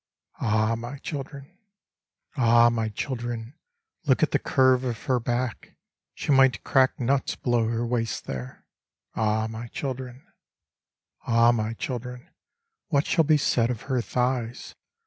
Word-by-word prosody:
Ah 110 Hz, 0 st, +1 dB
I -, -, +2 dB
my 120 Hz, +4 st, -5 dB
children 140 Hz, +4 st, -7 dB, 0.8 s
I 135 Hz, -, -2 dB
Ah 115 Hz, 0 st, +6 dB
I -, -, +6 dB
my 115 Hz, -2 st, -1 dB
children 120 Hz, +1 st, -4 dB
I 465 Hz, -, -18 dB
look -, -, +4 dB
at -, -, +2 dB
the -, -, +2 dB
curve 130 Hz, -2 st, +3 dB
of 120 Hz, -4 st, -4 dB
her 130 Hz, -3 st, +1 dB
back; 120 Hz, 0 st, -3 dB, 0.4 s
She -, -, -2 dB
might 135 Hz, -1 st, +4 dB
crack 130 Hz, -2 st, +3 dB
nuts 135 Hz, +2 st, 0 dB
below 120 Hz, -2 st, +1 dB
her 115 Hz, +1 st, -1 dB
waist 115 Hz, -1 st, -2 dB
there. 65 Hz, -1 st, -7 dB, 0.5 s
Ah 110 Hz, 0 st, +1 dB
I -, -, -1 dB
my 110 Hz, +1 st, -7 dB
children! 130 Hz, 0 st, -6 dB, 1.0 s
Ah 115 Hz, 0 st, +5 dB
I -, -, +7 dB
my 110 Hz, -1 st, -1 dB
children 125 Hz, 0 st, -5 dB
I -, -, -31 dB, 0.6 s
what 145 Hz, -3 st, +1 dB
shall 165 Hz, -3 st, +2 dB
be 155 Hz, 0 st, +4 dB
said 120 Hz, -4 st, +1 dB
of 120 Hz, -4 st, -4 dB
her 130 Hz, -3 st, 0 dB
thighs. 125 Hz, -1 st, -2 dB
120 Hz, 165 wpm, -26 LUFS, 115-135 Hz, 1.0 s, I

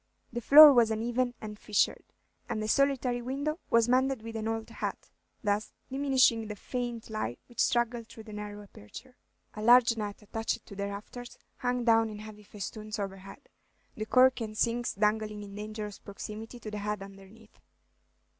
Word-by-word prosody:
The 240 Hz, -, -3 dB
floor 295 Hz, +4 st, +10 dB
was 235 Hz, -3 st, +5 dB
uneven 240 Hz, +3 st, -1 dB
and 210 Hz, -1 st, -8 dB
fissured, 210 Hz, -, +1 dB, 0.5 s
and -, -, -2 dB
the 215 Hz, -, -2 dB
solitary 255 Hz, -1 st, +1 dB
window 285 Hz, +6 st, -3 dB
was 230 Hz, 0 st, +4 dB
mended 260 Hz, -1 st, +2 dB
with 225 Hz, 0 st, -7 dB
an 220 Hz, 0 st, -3 dB
old 225 Hz, 0 st, -2 dB
hat, -, -, -6 dB, 0.3 s
thus 205 Hz, +1 st, -1 dB, 0.2 s
diminishing 260 Hz, -5 st, +3 dB
the 210 Hz, -, -5 dB
faint 240 Hz, +1 st, -5 dB
light 125 Hz, -, -3 dB
which 240 Hz, -, -15 dB
struggled 240 Hz, -2 st, +1 dB
through 230 Hz, -1 st, -12 dB
the 215 Hz, -1 st, -11 dB
narrow 210 Hz, 0 st, -7 dB
aperture. 205 Hz, -, -13 dB, 0.4 s
A 215 Hz, -, -7 dB
large 235 Hz, +1 st, +6 dB
net, 210 Hz, -1 st, -5 dB
attached 225 Hz, +2 st, -3 dB
to 200 Hz, -, -11 dB
the 200 Hz, 0 st, -3 dB
rafters, 210 Hz, +4 st, -8 dB, 0.2 s
hung 245 Hz, -1 st, -1 dB
down 225 Hz, -1 st, +4 dB
in 210 Hz, -, -7 dB
heavy 210 Hz, 0 st, -10 dB
festoons 210 Hz, +1 st, -7 dB
overhead, 195 Hz, -, -7 dB, 0.5 s
the 215 Hz, 0 st, -5 dB
corks 255 Hz, +1 st, +5 dB
and 215 Hz, -1 st, -5 dB
sinks 240 Hz, +1 st, 0 dB
dangling 210 Hz, 0 st, 0 dB
in 200 Hz, -1 st, -10 dB
dangerous 210 Hz, 0 st, -6 dB
proximity 215 Hz, +4 st, -8 dB
to 215 Hz, -, -7 dB
the 210 Hz, -, -4 dB
heads 210 Hz, -1 st, -3 dB
underneath. 195 Hz, +3 st, -15 dB
220 Hz, 170 wpm, -30 LUFS, 210-245 Hz, 0.5 s, floor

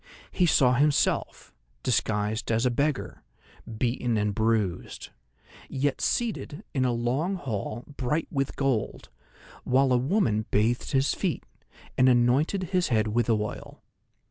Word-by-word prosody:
He 180 Hz, -, +2 dB
saw 125 Hz, -5 st, +4 dB
himself, 145 Hz, +3 st, +1 dB, 0.3 s
disguised 110 Hz, -2 st, 0 dB
as 115 Hz, +2 st, +1 dB
a 125 Hz, -, +3 dB
beggar, 140 Hz, +3 st, -2 dB, 0.6 s
beaten 120 Hz, -1 st, 0 dB
and 105 Hz, -1 st, 0 dB
bruised, 110 Hz, -4 st, -1 dB, 0.6 s
yet 135 Hz, 0 st, -1 dB
seated 215 Hz, -7 st, -2 dB
in 130 Hz, -2 st, +1 dB
a 125 Hz, -, +2 dB
long 125 Hz, +11 st, -1 dB
hall 120 Hz, -, -4 dB
bright 150 Hz, +5 st, -1 dB
with 135 Hz, -2 st, -2 dB
gold, 135 Hz, -6 st, -2 dB, 0.5 s
while 130 Hz, +1 st, +3 dB
a -, -, +4 dB
woman 125 Hz, -, +1 dB
bathed 115 Hz, +4 st, +1 dB
his 135 Hz, +1 st, +2 dB
feet, -, -, -2 dB, 0.6 s
and 130 Hz, 0 st, +6 dB
anointed 135 Hz, +10 st, +2 dB
his 180 Hz, -1 st, +2 dB
head 110 Hz, -3 st, +1 dB
with 120 Hz, +2 st, 0 dB
oil. 105 Hz, -2 st, -3 dB
125 Hz, 130 wpm, -27 LUFS, 110-140 Hz, 0.6 s, and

